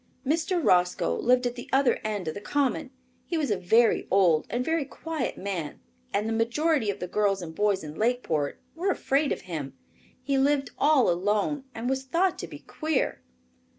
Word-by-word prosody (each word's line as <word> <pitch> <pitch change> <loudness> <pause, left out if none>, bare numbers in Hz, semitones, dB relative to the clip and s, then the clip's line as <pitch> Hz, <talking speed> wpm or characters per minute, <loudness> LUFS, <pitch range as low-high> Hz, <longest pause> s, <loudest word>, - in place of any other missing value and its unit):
Mr. 330 +5 +1
Roscoe 180 - +3
lived 250 - +2
at 245 - 0
the 245 - -9
other 270 -1 +3
end 205 -5 -3
of 155 - -1
the 205 - -7
common. 280 +3 0 0.4
He 340 - -1
was 295 -7 0
a - - +3
very 220 +6 +3
old 175 -5 +3
and 245 +1 -1
very 325 -2 +1
quiet 305 +1 -4
man, 180 -6 -4 0.3
and 210 - 0
the 225 - -1
majority 240 +3 +1
of 200 - -2
the - - -3
girls 195 -1 +1
and 160 -1 -7
boys 205 0 +1
in 150 -1 -7
Lakeport 210 -9 -1
were 355 +5 -1
afraid 285 -5 +1
of - - -2
him. 150 -7 -6 0.5
He 275 0 +1
lived 280 0 +2
all 290 -4 +4
alone 205 - 0
and 230 +2 -4
was 265 0 0
thought 345 +8 +1
to - - -5
be - - -9
queer. 310 -4 -2
240 Hz, 185 wpm, -27 LUFS, 190-285 Hz, 0.5 s, all